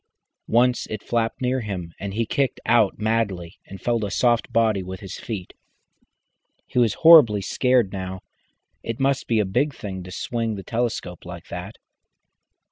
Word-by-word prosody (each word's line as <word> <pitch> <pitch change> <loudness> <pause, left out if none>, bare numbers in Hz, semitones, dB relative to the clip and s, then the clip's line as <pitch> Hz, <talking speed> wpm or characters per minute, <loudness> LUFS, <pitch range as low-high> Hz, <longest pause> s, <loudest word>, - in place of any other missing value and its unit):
Once 125 +1 +2
it 110 -2 -6
flapped 115 0 -1
near 125 +1 +1
him, 95 -6 -5
and 100 0 -5
he 115 +1 0
kicked 135 +3 -1
out 115 -3 +3
madly 105 -6 -1
and 95 - -9
felt 120 -2 0
a 100 - -2
soft 120 +3 +1
body 110 -4 +2
with 95 0 -7
his 95 -4 -8
feet. 100 -6 -6 1.1
He - - -1
was 115 -4 +3
horribly 135 -12 +8
scared 125 -2 +2
now. 95 -1 -5 0.6
It 115 0 -5
must 135 0 +1
be 115 - +2
a 105 - +2
big 135 +9 0
thing 95 -2 -6
to 90 - -10
swing 115 +4 -3
the 95 - -7
telescope 115 -6 -3
like 85 -1 -10
that. 90 +5 -7
110 Hz, 165 wpm, -23 LUFS, 95-120 Hz, 1.1 s, horribly